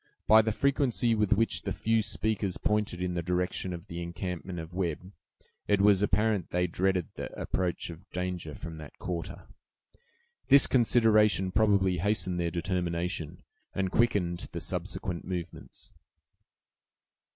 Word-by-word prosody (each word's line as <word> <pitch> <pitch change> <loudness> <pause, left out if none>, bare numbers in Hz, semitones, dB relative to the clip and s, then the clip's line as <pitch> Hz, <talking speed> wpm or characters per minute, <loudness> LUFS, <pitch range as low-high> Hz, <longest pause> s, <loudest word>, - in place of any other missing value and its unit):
By 110 +1 +7
the 110 0 -1
frequency 130 -2 +1
with 105 -1 +2
which 115 +2 +1
the - - -4
few 115 0 +1
speakers 105 -2 -1
pointed 105 -4 -1
in 90 -1 -1
the 85 - -1
direction 90 +2 -1
of 85 0 -7
the 85 -4 -6
encampment 90 +1 -5
of 80 +1 -7
Webb, 90 0 -3 0.6
it 105 -1 +3
was 100 -1 +5
apparent 105 -2 +1
they 90 0 +1
dreaded 90 0 0
the - - -6
approach 90 -1 -2
of 85 +4 -13
danger 90 -4 -4
from 80 -2 -8
that 75 -2 -11
quarter. 85 -2 -5 1.0
This 140 0 +7
consideration 110 -6 +3
probably 95 -4 +3
hastened 90 -2 0
their 85 -1 0
determination, 85 -2 -3 0.3
and 95 -1 -1
quickened 95 -7 +1
the 85 - -3
subsequent 90 +1 -3
movements. 90 -2 -7
95 Hz, 140 wpm, -29 LUFS, 85-105 Hz, 1.0 s, By